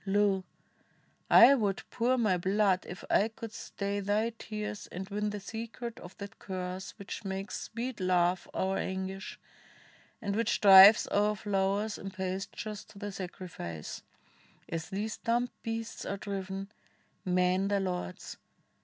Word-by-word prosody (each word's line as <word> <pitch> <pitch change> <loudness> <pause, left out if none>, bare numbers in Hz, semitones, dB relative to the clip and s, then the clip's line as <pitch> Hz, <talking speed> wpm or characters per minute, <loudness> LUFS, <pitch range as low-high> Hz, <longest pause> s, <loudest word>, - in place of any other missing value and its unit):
Lo! 195 -1 +2 0.9
I 245 +4 +9
would 205 -7 0
pour 250 +2 +2
my 215 -6 +3
blood 190 +1 +2
if 180 - -8
it 220 +2 +3
could 225 -1 -7
stay 200 -1 -3
Thy 210 +3 +1
tears 210 -2 -6
and 185 +2 -6
win 210 +1 -1
the 205 0 -4
secret 230 +3 -6
of 175 +1 -12
that 200 0 -9
curse 185 -1 -5
Which 200 - -7
makes 195 +1 -4
sweet 235 0 -5
love 180 -1 +2
our 190 +1 0
anguish, 190 +1 -4 0.8
and 200 -4 -2
which 230 +1 +1
drives 195 +1 +9
O'er 210 +1 +3
flowers 200 +1 0
and 195 - -6
pastures 190 +2 -4
to - - -16
the 205 0 -5
sacrifice 175 - -6 0.3
— - - -30
As 165 0 -4
these 210 +3 -3
dumb 240 +1 0
beasts 225 0 -4
are 200 - -3
driven 195 0 -5 0.3
— - - -36 0.2
men 185 0 +2
their 200 0 +1
lords. 180 0 -4
200 Hz, 145 wpm, -31 LUFS, 190-215 Hz, 0.9 s, I